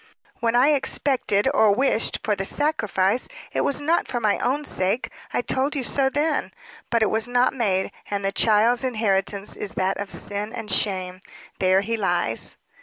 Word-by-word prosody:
"When 230 0 0
I 255 +4 +5
expected 265 -6 +1
or 215 -7 +4
wished, 260 -2 +1
for 210 - +1
the 195 - -3
'sacrifice,' 215 -5 +1 0.2
it - - 0
was 280 - 0
not 320 +4 +1
for 240 - -2
my 215 -3 +1
own 285 +4 0
sake; 190 +3 -1 0.2
I - - -1
told 270 +5 0
you 275 - -1
so 265 +2 +1
then. 295 +2 -1 0.4
But 230 -2 +2
it 215 - +1
was 220 +1 0
not 245 +1 +2
made; 195 -7 0 0.2
and 200 -1 -2
the 195 - +1
child's 225 +4 +3
inheritance 205 -4 -1
is 205 - -3
that 190 +1 0
of 200 -1 -4
sin 205 +3 -4
and 225 -4 -5
shame. 185 -2 0 0.4
There 185 +1 +3
he 230 +3 -2
lies." 175 - 0
220 Hz, 180 wpm, -23 LUFS, 195-255 Hz, 0.4 s, I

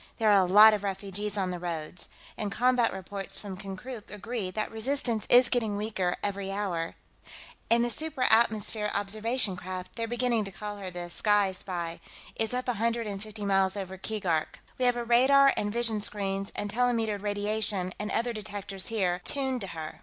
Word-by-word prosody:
"There 220 -2 +3
are 200 -2 +6
a - - +1
lot 215 +2 +9
of 205 -1 -2
refugees 200 +1 -3
on 185 -2 0
the 180 - -4
roads. 170 0 -5 0.3
And 210 -2 -3
combat 245 +1 +3
reports 195 +1 -5
from 200 -3 -7
Konkrook 200 +5 -8
agree 210 -1 -4
that 215 +3 -3
resistance 225 -1 0
is 245 0 +8
getting 220 -5 0
weaker 205 -4 -1
every 200 -1 -2
hour.... 185 -5 -2 0.7
And 235 +1 +5
the 240 - -1
supra 275 0 -1
atmosphere 220 -1 +2
observation 215 +1 +1
craft 185 0 -7
they're 230 -1 -2
beginning 240 -1 +1
to 195 - -7
call 205 +1 -6
her 195 -2 -5
the 175 -1 -6
Sky 205 -1 +3
Spy 175 -3 -4 0.4
is 220 -1 0
up 250 +1 -2
a 245 - +2
hundred 230 0 +1
and 200 -2 -5
fifty 215 -1 -7
miles 195 0 +2
over 190 -1 -5
Keegark. 185 -6 -1 0.2
We 255 - +2
have 245 -1 +4
radar 260 +4 +5
and 205 - -1
vision 225 -2 +1
screens 195 -1 -3
and 205 - -3
telemetered 225 -3 +1
radiation 205 -2 -1
and 210 0 -3
other 235 +1 0
detectors 200 -2 -5
here, 185 -5 0
tuned 265 -3 -1
to 195 - -4
her. 160 -3 -7
210 Hz, 185 wpm, -28 LUFS, 195-230 Hz, 0.7 s, lot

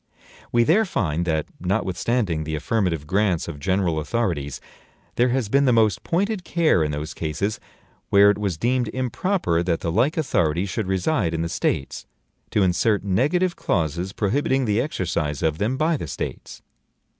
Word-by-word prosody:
We 120 0 +4
there 180 - +4
find 85 - -1
that, 80 -3 0
notwithstanding 95 -1 -1
the 80 0 -3
affirmative 85 -2 -1
grants 95 0 +1
of 80 -4 -6
general 90 -1 0
authorities, 75 -4 -2 0.5
there 125 +1 +2
has 125 -3 0
been 140 +6 +3
the 130 - +4
most 110 -3 +3
pointed 195 +3 -1
care 165 - +2
in 75 - -1
those 75 +2 -4
cases 85 +7 -2 0.5
where 100 +1 +6
it 105 - -3
was 100 -6 -2
deemed 120 +5 +1
improper 130 - 0
that 85 -2 -1
the 85 - -1
like 125 - +1
authorities 90 - +1
should 105 +1 -2
reside 95 - 0
in 80 - -1
the 85 - -3
States, 70 - -2 0.4
to 105 - +2
insert 95 +4 +2
negative 150 - +1
clauses 85 +1 -1
prohibiting 130 +6 0
the 105 +1 +1
exercise 85 - -2
of 80 -1 0
them 115 +6 0
by 155 +2 +1
the 85 - -6
States. - - -6
100 Hz, 165 wpm, -23 LUFS, 85-125 Hz, 0.5 s, where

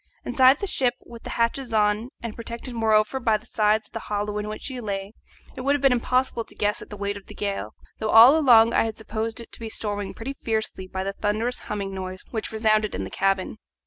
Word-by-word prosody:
Inside 260 +2 +5
the - - 0
ship, 255 -10 0
with 235 -1 -11
the - - -8
hatches 235 +1 -1
on, 210 +2 +2
and 230 -2 -5
protected 235 +2 -6
moreover 220 +2 +2
by 225 -4 +2
the - - -19
sides 215 0 +1
of - - -34
the 225 - -3
hollow 210 -1 -3
in 210 - -4
which 215 - -7
she 260 -3 -5
lay, 200 -1 -4 0.4
it - - -6
would 280 +3 +2
have 290 - -2
been 275 - +6
impossible 250 0 +1
to - - -16
guess 205 0 0
at - - -10
the 210 - -8
weight 200 0 -2
of 200 - -14
the 210 - -11
gale, 195 - -3 0.2
though 220 - -2
all 235 +7 +9
along 235 -7 +6
I - - +3
had 220 -1 -4
supposed 220 +1 -4
it 235 - -10
to - - -10
be 225 -1 -5
storming 205 -2 -4
pretty 270 +5 -6
fiercely 220 -4 -2
by 190 0 -4
the 195 +1 -3
thunderous 215 +5 -1
humming 200 -2 -4
noise 185 0 -6
which 220 -2 -3
resounded 215 -1 +1
in - - -3
the 95 - -7
cabin. 195 +2 0
220 Hz, 240 wpm, -25 LUFS, 205-235 Hz, 0.4 s, all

